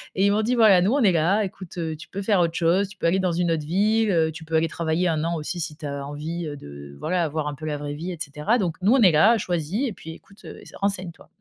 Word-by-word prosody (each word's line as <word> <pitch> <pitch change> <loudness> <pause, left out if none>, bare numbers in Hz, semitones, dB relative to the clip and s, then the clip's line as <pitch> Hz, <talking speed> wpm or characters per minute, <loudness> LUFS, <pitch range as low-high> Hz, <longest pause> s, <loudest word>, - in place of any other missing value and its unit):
et 190 - +2
ils 200 - +3
m'ont 210 - +2
dit: 240 +3 0
«Voilà, 215 -6 +6
nous 200 +6 +2
on 285 - +2
est 200 - +5
là, 175 +6 +2
écoute, 185 -2 -8
heu, 160 -2 -3
tu 155 - -12
peux 200 - -6
faire 200 -1 +2
autre 170 -1 +1
chose, 180 +4 +2
tu 200 - -14
peux - - 0
aller 180 +3 +2
dans 185 -2 0
une 175 0 0
autre 155 -2 -1
ville, 210 +6 +2
heu, 160 -4 +2
tu 160 +1 -10
peux 160 0 -3
aller 160 +1 +2
travailler 170 +2 0
1 155 -2 0
an 170 +1 -1
aussi 160 +2 -4
si 160 -2 -4
tu 150 - -10
as 140 -1 -5
envie, 160 +4 -5
heu, 145 - -5
de 70 - -11
voilà, 175 -1 0
voir 155 0 -3
un 145 - -6
peu 155 +2 -9
la 150 -1 -2
vraie 145 0 -5
vie 165 +5 -5
et - - -9
cetera. 150 - 0
Donc 175 -8 -2
nous 205 +6 +4
on 265 - +4
est 190 -5 +7
là, 215 +10 +5
choisis 180 - -2
et - - -6
puis 165 -5 -10
écoute, 195 +5 -16
heu, - - -10
ess - - -14
renseigne-toi» 190 -4 -4
170 Hz, 305 wpm, -24 LUFS, 155-195 Hz, -, est